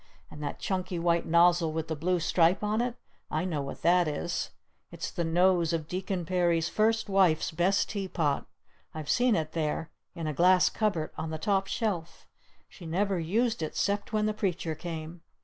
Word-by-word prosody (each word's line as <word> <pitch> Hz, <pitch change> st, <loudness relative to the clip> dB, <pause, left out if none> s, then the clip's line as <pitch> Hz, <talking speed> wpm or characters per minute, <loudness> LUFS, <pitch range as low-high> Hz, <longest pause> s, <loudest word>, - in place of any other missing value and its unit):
And 150 Hz, -, -10 dB
that 145 Hz, -, -4 dB
chunky 185 Hz, -3 st, -2 dB
white 170 Hz, 0 st, +1 dB
nozzle 170 Hz, 0 st, +4 dB
with 160 Hz, 0 st, -3 dB
the 160 Hz, -, -2 dB
blue 175 Hz, +4 st, 0 dB
stripe 170 Hz, +3 st, +2 dB
on 210 Hz, +2 st, +1 dB
it? 245 Hz, 0 st, -2 dB, 0.3 s
I 155 Hz, +3 st, -1 dB
know 160 Hz, -6 st, -2 dB
what 140 Hz, -, -7 dB
that 175 Hz, 0 st, +4 dB
is! 155 Hz, +3 st, -2 dB, 0.4 s
It's -, -, -5 dB
the 175 Hz, -, -2 dB
nose 175 Hz, 0 st, +3 dB
of 160 Hz, -2 st, -2 dB
Deacon 185 Hz, 0 st, -3 dB
Perry's 170 Hz, -2 st, +1 dB
first 225 Hz, +1 st, +1 dB
wife's 190 Hz, -5 st, +3 dB
best 175 Hz, +5 st, +1 dB
tea 200 Hz, -3 st, -3 dB
pot! 150 Hz, -6 st, -1 dB, 0.5 s
I've 155 Hz, -2 st, -3 dB
seen 245 Hz, -2 st, +3 dB
it 155 Hz, -3 st, -2 dB
there! 160 Hz, 0 st, -2 dB, 0.2 s
In 165 Hz, -2 st, -5 dB
a 155 Hz, -, -1 dB
glass 180 Hz, +4 st, +4 dB
cupboard! 200 Hz, -8 st, -1 dB
On 160 Hz, -, -3 dB
the 160 Hz, -, -3 dB
top 195 Hz, +4 st, 0 dB
shelf! 190 Hz, -9 st, -3 dB, 0.4 s
She 175 Hz, -, -11 dB
never 190 Hz, +3 st, 0 dB
used 220 Hz, +6 st, 0 dB
it 155 Hz, -, -4 dB
'cept 200 Hz, +1 st, -1 dB
when 215 Hz, -1 st, +1 dB
the 215 Hz, -, +1 dB
Preacher 185 Hz, -6 st, -2 dB
came!" 160 Hz, +1 st, -7 dB
175 Hz, 185 wpm, -29 LUFS, 160-195 Hz, 0.5 s, nozzle